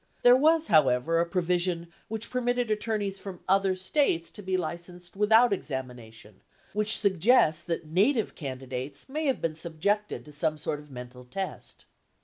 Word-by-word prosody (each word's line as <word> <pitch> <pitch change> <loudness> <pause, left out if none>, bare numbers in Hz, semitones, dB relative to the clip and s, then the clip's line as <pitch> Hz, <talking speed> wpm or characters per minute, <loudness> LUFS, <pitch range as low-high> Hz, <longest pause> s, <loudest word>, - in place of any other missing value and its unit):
There 245 0 +8
was, 315 +4 +4
however, 150 - +3
a 170 - +1
provision 175 -1 -1
which 220 +1 -5
permitted 245 -2 0
attorneys 210 -2 -1
from 190 -2 -8
other 195 0 +3
States 185 - 0
to - - -8
be 190 -1 -1
licensed 175 +1 -6
without 220 +3 +5
examination, 120 - -7 0.3
which 210 +1 +3
suggests 190 -4 +3
that 170 -1 -3
native 205 - +1
candidates 130 -1 -6
may 305 +3 -2
have 265 - 0
been 165 -1 0
subjected 175 +6 -2
to 150 - -12
some 155 +1 -1
sort 150 -1 -3
of 150 0 -15
mental 125 -1 -10
test 190 +10 -6
2 - - -20
180 Hz, 155 wpm, -28 LUFS, 155-210 Hz, 0.3 s, There